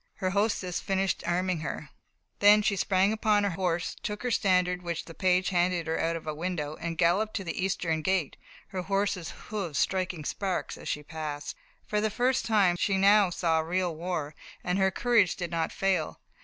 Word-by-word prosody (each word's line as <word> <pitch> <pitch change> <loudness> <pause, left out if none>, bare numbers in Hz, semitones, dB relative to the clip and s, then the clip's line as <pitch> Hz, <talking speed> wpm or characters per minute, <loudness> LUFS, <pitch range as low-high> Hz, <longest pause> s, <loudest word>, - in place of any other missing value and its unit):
Her 185 -3 -1
hostess 200 -3 0
finished 190 -1 0
arming 180 0 0
her, 155 - -5 0.5
then 210 +1 +7
she 200 -1 +2
sprang 195 +1 +2
upon 215 -1 +2
her 200 - +1
horse, 175 -1 -1
took 210 +2 -4
her 250 - -1
standard 180 -4 +2
which 170 -2 -4
the 165 - -10
page 185 +1 +2
handed 175 -2 +1
her 160 0 -1
out 165 0 0
of 165 - -6
a 155 - -2
window, 155 -2 -3
and 165 -1 -4
galloped 190 +6 +2
to 195 - -2
the 180 +1 -3
eastern 170 -4 0
gate, 185 -3 0 0.3
her 190 -2 -3
horse's 195 -2 -1
hoofs 195 -9 -5
striking 185 -3 -1
sparks 190 +2 -2
as - - -10
she 150 - -2
passed. 150 -2 -5 0.3
For 210 -1 0
the 215 - +1
first 250 +4 +1
time 200 -6 +3
she 195 +2 +1
now 200 0 +5
saw 165 -2 +1
real 175 +1 -1
war, 165 -3 -3 0.3
and 180 +2 0
her 190 0 +4
courage 225 -2 +2
did 175 -2 -5
not 165 -1 -1
fail. 185 - -1
185 Hz, 190 wpm, -28 LUFS, 165-200 Hz, 0.5 s, then